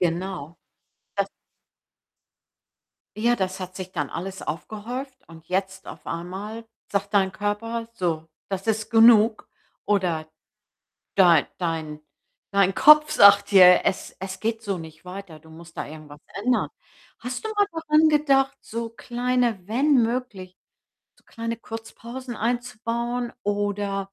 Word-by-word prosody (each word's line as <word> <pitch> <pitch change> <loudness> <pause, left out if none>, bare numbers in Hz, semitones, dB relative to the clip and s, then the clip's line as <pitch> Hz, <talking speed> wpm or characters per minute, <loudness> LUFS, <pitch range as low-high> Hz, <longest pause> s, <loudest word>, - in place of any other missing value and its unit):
Genau, 175 -2 -2 0.6
das - - 0 1.9
Ja, 240 +2 +3
das 190 -2 -3
hat 185 0 -7
sich 185 -1 -7
dann 150 -6 -3
alles 190 +3 -6
aufgehäuft 225 - -6
und 160 -1 -15
jetzt 190 +1 -2
auf - - -10
einmal 195 +7 -6 0.3
sagt 200 +1 -1
dein 190 -1 +3
Körper: 225 +4 -3
„So, 165 -6 -2 0.2
das 195 +2 -4
ist 220 +1 -1
genug.“ 225 -1 +5 0.4
Oder 180 -6 0 0.9
dei 175 -6 +5
dein 160 -3 -3 0.5
dein 195 -1 +3
Kopf 300 0 +7
sagt 200 -4 +7
dir: 180 -2 +8
„Es 185 - -1
es 190 0 -6
geht 225 0 -2
so 200 -4 -2
nicht 160 0 -11
weiter, 180 -3 -9
du 160 +1 -19
musst 165 +1 -14
da - - -3
irgendwas 150 -1 -12 0.2
ändern.“ 250 0 +2 0.5
Hast 255 - -5
du - - -3
mal 410 0 +4
daran 315 -1 +3
gedacht, 275 -3 +2
so 230 0 -5
kleine 245 -1 -1
wenn 270 +8 +2
möglich, 225 -6 -4 0.6
so - - -28
kleine 230 0 -4
Kurzpausen 235 +2 -8
einzubauen 240 +1 -2
oder 205 -1 -2
205 Hz, 130 wpm, -24 LUFS, 180-235 Hz, 1.9 s, dir